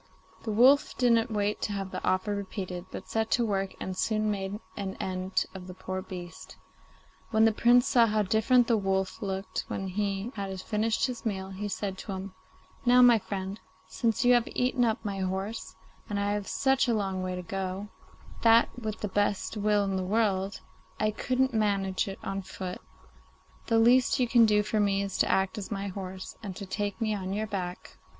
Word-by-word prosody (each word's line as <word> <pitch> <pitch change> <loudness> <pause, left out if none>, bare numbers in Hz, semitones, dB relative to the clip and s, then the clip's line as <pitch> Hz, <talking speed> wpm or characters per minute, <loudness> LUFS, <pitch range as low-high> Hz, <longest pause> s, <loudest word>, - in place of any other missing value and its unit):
The 220 - -3
wolf 260 +7 +5
didn't 235 -1 +3
wait 210 -1 -1
to 205 - -1
have 195 -1 -4
the 185 - -5
offer 185 +3 +1
repeated, 185 -2 -5
but 190 - -8
set 220 0 -1
to 240 - +2
work, 195 -2 -1
and 185 - -4
soon 215 +2 0
made 200 0 -3 0.2
an 195 -1 -4
end 185 0 -1
of 185 -1 -9
the 185 - -9
poor 185 0 -4
beast. 180 -2 -9 0.7
When 220 0 +4
the 225 - +5
Prince 240 +3 +5
saw 235 -2 +5
how 215 0 +1
different 220 +5 +3
the 230 -1 +2
wolf 190 +1 -1
looked 195 -1 -3
when 195 -1 -3
he 200 +3 -2
had 195 -2 -5
finished 220 +3 0
his 250 -3 -5
meal, 190 -3 -3
he 200 +2 -4
said 195 -1 -4
to 200 - -5
him, 190 0 -6 0.5
'Now, 250 0 +6
my 240 -2 +7
friend, 195 0 -5 0.3
since 230 +1 0
you 245 - +7
have 240 -1 +3
eaten 250 0 +2
up 225 0 0
my 200 -1 -3
horse, 190 +4 -3 0.3
and 205 -1 -1
I 200 0 0
have 205 -2 -3
such 270 -1 +2
a 235 - +2
long 195 -3 -1
way 185 0 -3
to 180 - -5
go, 195 +2 -4 0.5
that, 230 0 +6
with 220 -2 -5
the 210 - -1
best 205 +2 0
will 210 -1 +2
in 195 -1 -1
the 185 - -1
world, 195 -1 0 0.4
I 215 0 +2
couldn't 255 +4 0
manage 200 -4 +1
it 195 - -5
on 195 0 -3
foot, 185 -1 -6 0.9
the 230 - +3
least 245 +3 +5
you 250 - +3
can 230 -1 +6
do 210 -1 +3
for 210 +1 -1
me 200 -1 +2
is 195 -1 -4
to - - +3
act 190 +3 +1
as 195 - -6
my 200 -1 -3
horse 190 -1 -7
and 195 -4 -6
to 200 - -6
take 205 +2 -3
me 220 -2 0
on 190 -2 -3
your 215 +2 -1
back. 185 -4 -6
205 Hz, 200 wpm, -29 LUFS, 190-225 Hz, 0.9 s, my